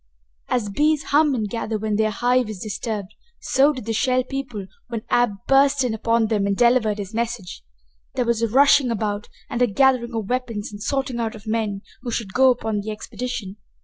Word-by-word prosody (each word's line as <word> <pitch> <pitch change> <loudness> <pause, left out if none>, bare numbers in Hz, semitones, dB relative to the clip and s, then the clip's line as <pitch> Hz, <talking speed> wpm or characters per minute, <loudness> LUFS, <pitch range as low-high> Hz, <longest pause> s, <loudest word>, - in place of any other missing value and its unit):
As 240 -4 0
bees 300 +7 +2
hum 295 -1 +4
and 220 -3 -1
gather 220 0 -3
when 215 0 -1
their 215 +1 +2
hive 245 +2 +1
is 215 - -5
disturbed, 210 0 -4 0.3
so 275 +3 +3
did 255 -7 -7
the 225 - -1
Shell 255 +3 +2
People 250 -7 -5 0.2
when 230 -2 -5
Ab 240 -3 +3
burst 275 0 +4
in 245 -3 0
upon 230 +1 +1
them 210 -2 0
and 200 -1 0
delivered 235 -3 +3
his 200 0 -6
message. 230 - -3 0.5
There 250 - +1
was 235 -1 0
rushing 275 0 +5
about 210 -2 -2 0.2
and 240 - -3
a 245 - +5
gathering 240 +1 +2
of 220 -3 -2
weapons 235 -4 -3
and 205 - -9
a - - -14
sorting 270 0 -1
out 225 0 -2
of 215 0 -13
men 215 -2 -2 0.2
who 245 - -5
should 225 -4 -3
go 265 +1 +5
upon 220 -4 0
the 205 +2 -5
expedition. 215 -1 -5
230 Hz, 200 wpm, -22 LUFS, 215-255 Hz, 0.5 s, rushing